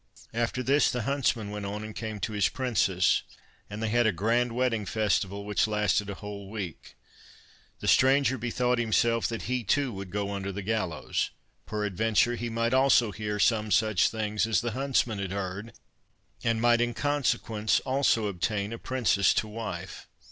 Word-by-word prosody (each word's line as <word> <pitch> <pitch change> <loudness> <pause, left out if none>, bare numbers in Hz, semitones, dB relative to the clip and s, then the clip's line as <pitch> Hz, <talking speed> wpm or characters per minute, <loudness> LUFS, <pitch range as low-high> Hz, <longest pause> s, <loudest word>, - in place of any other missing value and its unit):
After 120 +2 -1
this 140 +3 +3
the 125 -2 -2
huntsman 120 -5 0
went 105 -1 -4
on 105 +1 -5
and 110 0 -8
came 110 -2 -5
to 110 - -2
his 105 -2 +2
princess, 100 - +1 0.5
and 105 +2 -5
they 110 - 0
had 120 +1 +3
a - - +3
grand 115 +7 +1
wedding 120 -2 0
festival, 100 -1 -1
which 105 +1 +1
lasted 105 -1 +1
a 100 - -4
whole 100 -1 -8
week. 100 -7 -7 0.9
The - - -4
stranger 130 -1 +4
bethought 125 +1 0
himself 115 0 +2
that 115 -1 -4
he, 125 0 -2
too, 135 +4 +1
would 95 -1 -7
go 100 +1 -2
under 100 0 -3
the 100 +1 -5
gallows; 100 -6 -1 0.4
peradventure 110 +3 +1
he 120 0 -4
might 115 +1 0
also 130 -4 +4
hear 105 0 -3
some 110 +1 +2
such 110 0 +3
things 110 -1 -1
as 115 - +2
the 120 -1 -2
huntsman 130 -4 0
had 95 -2 -3
heard, 100 +3 -4 0.7
and 115 -1 +1
might 120 0 +4
in 120 -1 0
consequence 115 -5 0
also 130 -4 +1
obtain 100 +2 -2
a 115 - -6
princess 105 -7 +2
to 110 - 0
wife. 105 -5 -6
110 Hz, 170 wpm, -28 LUFS, 100-120 Hz, 0.9 s, stranger